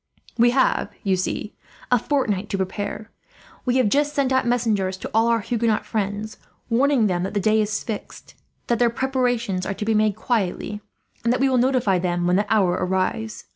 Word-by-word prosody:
"We 240 +1 +5
have, 260 +2 +2
you 195 -3 +2
see, 185 +3 -3 0.4
a 245 - +5
fortnight 215 -8 -1
to 195 - -1
prepare. 205 +3 -4 0.5
We 250 0 +2
have 255 -4 +3
just 290 +6 +1
sent 270 -2 +1
out 260 -2 +2
messengers 215 -6 0
to - - -7
all 225 +1 +3
our 230 -1 +2
Huguenot 230 -1 0
friends, 210 0 -3 0.3
warning 260 0 +3
them 180 -3 0
that 195 +3 -4
the - - +2
day 215 +2 +3
is 215 0 -2
fixed, 220 -3 -7 0.3
that 235 - 0
their 240 -1 +4
preparations 245 -6 -1
are 200 - -3
to 210 - -4
be 225 - +2
made 215 -1 +2
quietly, 210 -2 -2 0.4
and 235 - +2
that 250 - +1
we 270 0 +3
will 255 -1 +2
notify 245 -7 +2
them 175 -1 -1
when 180 +1 +3
the 205 +2 0
hour 200 -5 +3
arrives. 190 +4 -2
220 Hz, 195 wpm, -23 LUFS, 200-245 Hz, 0.5 s, We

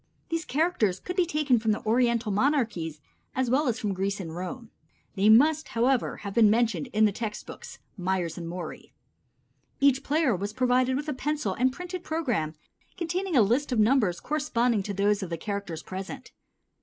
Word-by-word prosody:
These 330 -1 -2
characters 265 - +1
could 360 - -6
be 360 -2 +2
taken 295 -7 +2
from 220 -1 +1
the - - -6
Oriental 235 -1 +2
monarchies 210 - 0 0.3
as 255 -2 0
well 285 +3 +2
as 235 - 0
from 205 -2 -1
Greece 195 +2 -2
and 165 -4 -6
Rome. 220 +6 -6 0.4
They 200 +1 +3
must, 300 +7 +5
however, 245 +2 +1
have 200 - -4
been 220 -2 +6
mentioned 220 -7 +1
in 215 +1 +3
the 210 - +3
text 215 +1 -5
books - - -10 0.2
(Myers 180 -2 -1
and 170 -1 -6
Morey). 175 0 -7 0.9
Each 275 -1 +4
player 295 -6 +2
was 200 +3 -4
provided 255 +1 +2
with 295 +2 -4
a 300 - -1
pencil 285 -6 -2
and 255 +6 +2
printed 360 +4 -6
program 240 - -1 0.4
containing 355 +1 -2
a 240 - +7
list 250 +8 +1
of 245 - +1
numbers 215 -5 +3
corresponding 245 -7 0
to 200 +1 -4
those 205 +1 +2
of 190 - -4
the 165 - -3
characters 195 -3 -5
present. 195 +8 -7
230 Hz, 180 wpm, -27 LUFS, 200-280 Hz, 0.9 s, a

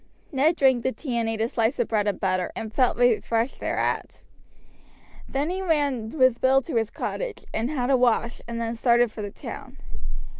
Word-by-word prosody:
Ned 300 +4 +3
drank 265 -5 +4
the 260 - 0
tea 260 -3 -5
and 225 -1 0
ate 220 -1 -2
a 225 - +2
slice 230 +1 0
of - - +1
bread 210 -2 +1
and 205 - -1
butter, 185 -2 0
and 220 -1 -5
felt 255 +1 +2
refreshed 235 0 +1
thereat. - - -2 1.1
Then 285 +5 -1
he 375 +1 -2
ran 285 -10 0
with 255 -3 +4
Bill 265 +1 +4
to 275 -5 -2
his 225 -1 +1
cottage - - -4
and 230 +3 -1
had 270 -3 0
a 265 - +5
wash, 240 -1 +1
and 235 0 -4
then 230 0 -2
started 235 0 +3
for 215 - -7
the 205 - -4
town. - - -9
240 Hz, 195 wpm, -25 LUFS, 225-270 Hz, 1.1 s, a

